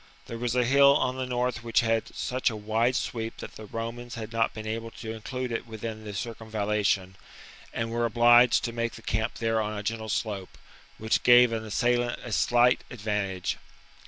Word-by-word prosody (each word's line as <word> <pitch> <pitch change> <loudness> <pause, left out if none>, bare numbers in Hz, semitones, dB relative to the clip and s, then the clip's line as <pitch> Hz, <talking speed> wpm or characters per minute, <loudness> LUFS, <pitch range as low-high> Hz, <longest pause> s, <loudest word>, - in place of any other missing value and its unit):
There 115 -1 -7
was 120 0 -1
a 125 -1 +3
hill 140 +2 +6
on 130 0 0
the 130 -1 -3
north 125 -1 -1
which 115 -1 +2
had 115 -1 0
such 130 +1 0
a 115 - -5
wide 110 +4 0
sweep 115 -2 -3
that - - -8
the 110 - -9
Romans 120 +2 -5
had 110 -1 -6
not 115 0 +1
been 110 0 -8
able 115 +1 -4
to 110 0 -7
include 125 +3 -5
it 115 +1 -3
within 110 0 -6
the 105 - -6
circumvallation, 105 -3 -1 0.5
and 115 0 -3
were 120 0 0
obliged 120 +1 +5
to 115 - -3
make 115 0 -2
the 115 -1 -12
camp 110 +1 -1
there 115 -1 0
on 105 0 -3
a 105 - -5
gentle 110 +1 -3
slope, 100 -4 -3 0.4
which 110 +1 +1
gave 120 -1 +7
an 110 -1 -2
assailant 120 +2 0
a 120 - -7
slight 120 +3 +3
advantage. 105 -2 -2
115 Hz, 190 wpm, -27 LUFS, 110-120 Hz, 0.5 s, gave